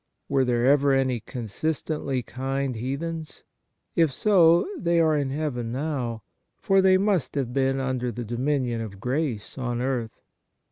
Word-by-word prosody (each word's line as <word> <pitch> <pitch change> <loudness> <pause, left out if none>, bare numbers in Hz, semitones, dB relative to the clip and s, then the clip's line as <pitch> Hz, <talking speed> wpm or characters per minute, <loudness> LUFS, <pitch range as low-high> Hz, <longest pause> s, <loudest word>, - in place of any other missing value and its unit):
Were 135 -1 +2
there 120 -1 +1
ever 140 0 +4
any 130 -2 +1
consistently 135 +4 -3
kind 135 +2 -3
heathens? 150 +7 -5 0.5
If 165 -4 +3
so, 170 +1 +4
they 170 - +1
are 160 -2 +4
in 140 -2 0
heaven 135 -5 -3
now, 125 -5 -3 0.3
for 195 0 +3
they 190 0 +5
must 190 - 0
have 130 -4 -2
been 135 0 +1
under 130 -2 -1
the 120 +1 -5
dominion 120 0 -1
of 100 -4 -7
grace 125 -3 -2
on 120 -2 -2
earth. 125 -3 -2
135 Hz, 145 wpm, -25 LUFS, 120-155 Hz, 0.5 s, they